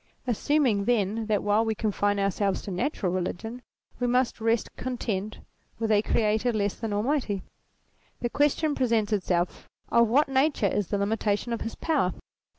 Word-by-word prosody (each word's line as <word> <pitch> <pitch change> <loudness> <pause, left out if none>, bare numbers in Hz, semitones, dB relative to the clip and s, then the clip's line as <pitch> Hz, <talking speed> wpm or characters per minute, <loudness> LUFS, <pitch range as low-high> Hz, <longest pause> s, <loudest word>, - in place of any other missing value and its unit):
Assuming 245 -3 +1
then 220 -1 +1
that 210 -2 +1
while 205 +2 +3
we 220 -1 -1
confine 205 -1 0
ourselves 195 0 0
to 200 - -5
Natural 190 -3 -1
Eeligion 185 +6 -3 0.4
we 245 - +1
must 250 -1 +1
rest 225 0 0
content 215 -5 -3 0.4
with 225 -1 -1
a 205 -1 +5
Creator 220 +2 +1
less 205 -2 0
than 225 -2 -5
Almighty; 210 -2 0 0.8
the 240 - -1
question 295 +1 +2
presents 230 -5 +1
itself, 180 -3 -1 0.2
of 235 0 +5
what 275 +7 +3
nature 270 -3 +2
is 200 -1 0
the 205 - -1
limitation 210 +2 0
of 230 - -3
his 225 - -4
power? 285 - +1
220 Hz, 155 wpm, -27 LUFS, 205-245 Hz, 0.8 s, a